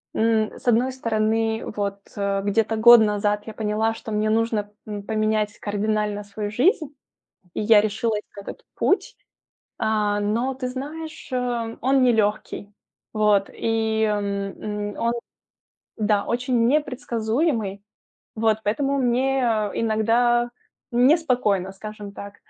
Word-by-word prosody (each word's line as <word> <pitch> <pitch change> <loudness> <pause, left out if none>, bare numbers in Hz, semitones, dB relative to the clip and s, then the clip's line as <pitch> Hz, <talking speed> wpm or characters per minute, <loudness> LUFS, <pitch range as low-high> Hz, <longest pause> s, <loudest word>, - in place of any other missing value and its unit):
М, 220 -1 +2
с - - -15
одной 240 +3 +3
стороны, 225 -2 0
вот 200 -1 -2 0.2
где-то 200 +3 0
год 235 +2 +9
назад 210 -1 +1
я 220 - -7
поняла, 220 +1 0
что 225 - -8
мне 215 0 0
нужно, 220 -2 0 0.2
м, 205 -1 -5
поменять 215 0 0
кардинально 210 0 -1
свою 205 +1 -5
жизнь, 310 - +2 0.7
и - - -2
я 210 0 +6
решилась 215 +1 -1
на 200 - -8
этот - - -10
путь. 390 - +1 0.6
А, 210 -2 +1
но 230 +6 0
ты 255 -1 -4
знаешь, 305 +5 -7
а, 240 -2 -2
он 265 +1 +3
нелегкий, 215 -3 0 0.4
вот, 210 -2 +2
и 220 -1 0 0.9
он, 235 0 +1 0.8
да, 210 -2 +1
очень 245 -1 +1
непредсказуемый, 235 - 0 0.5
вот 220 -1 +2
поэтому 275 +6 0
мне 260 +2 +1 0.3
иногда 230 +2 +2 0.4
неспокойно, 245 - +2
скажем 205 0 -9
так. 200 0 -9
220 Hz, 115 wpm, -23 LUFS, 210-240 Hz, 0.9 s, год